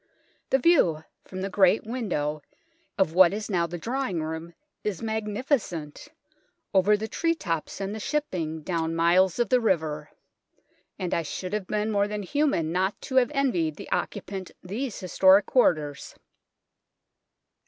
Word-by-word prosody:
The 265 - +4
view 245 - +3 0.2
from 185 0 -7
the 195 - -2
great 190 +2 +4
window 175 -11 -2 0.6
of 190 -5 +2
what 185 +1 +6
is 215 0 -5
now 170 -3 +1
the 175 +1 -6
drawing 230 -5 -2
room 160 +2 -6 0.3
is 205 -5 -2
magnificent, 215 - -2 0.7
over 200 +2 +4
the 220 +2 -4
tree 330 +8 0
tops 165 - -4
and 195 +1 -3
the 220 - -5
shipping 175 - -2
down 165 -1 -1
miles 175 +2 +3
of 240 -4 +1
the 250 -1 +4
river; 155 -8 0 0.9
and 185 -3 -3
I - - +1
should 180 +4 -5
have 210 -3 -2
been 215 +1 -1
more 200 -1 +2
than 210 0 -4
human 235 - 0
not 190 +3 0
to 260 - -3
have 245 -2 +5
envied 180 - +1
the - - -10
occupant 190 -2 -3
these 215 +6 -4
historic 190 +2 +5
quarters. 150 - +1
190 Hz, 150 wpm, -26 LUFS, 165-220 Hz, 0.9 s, what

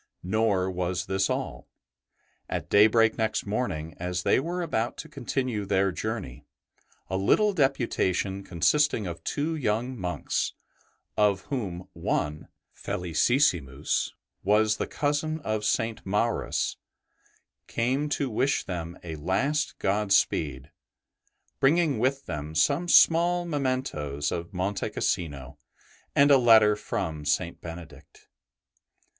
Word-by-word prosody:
Nor 95 -1 +1
was 90 0 -2
this 95 0 0
all. - - -4 0.8
At - - -4
daybreak 110 +2 +5
next 110 -1 0
morning, 100 -7 -2
as 90 0 -2
they - - +3
were 175 +5 -3
about 120 -7 -2
to 160 - -7
continue 130 -6 -2
their 95 0 +1
journey, 90 - -5 0.6
a 95 - -2
little 205 - +3
deputation 115 - 0
consisting 105 - +2
of 85 -2 -6
two 155 +3 -1
young 125 -2 -1
monks, 90 -5 -2 0.6
of 100 -2 +2
whom 90 -8 -4
one, 75 +1 -2 0.3
Felicissimus, 85 - 0 0.3
was 105 +2 +3
the - - -2
cousin 150 +2 -1
of 110 -5 -2
St. 110 +1 0
Maurus, 105 +4 -1 0.9
came 130 +6 0
to 145 -1 0
wish 130 +4 0
them 85 -2 -5
a 80 -3 -6
last 130 - 0
godspeed, 90 -9 +1 0.9
bringing 155 +1 +3
with 135 +2 0
them 75 -1 -5
some 145 - +2
small 175 +1 +5
mementoes 130 - -2
of 85 +1 -4
Monte 95 +1 -2
Cassino 70 -7 -3 0.6
and 145 +1 +6
a 135 - +7
letter 110 -3 +6
from 80 -6 -4
St. - - -1
Benedict. 85 -1 -11
105 Hz, 115 wpm, -27 LUFS, 90-135 Hz, 0.9 s, a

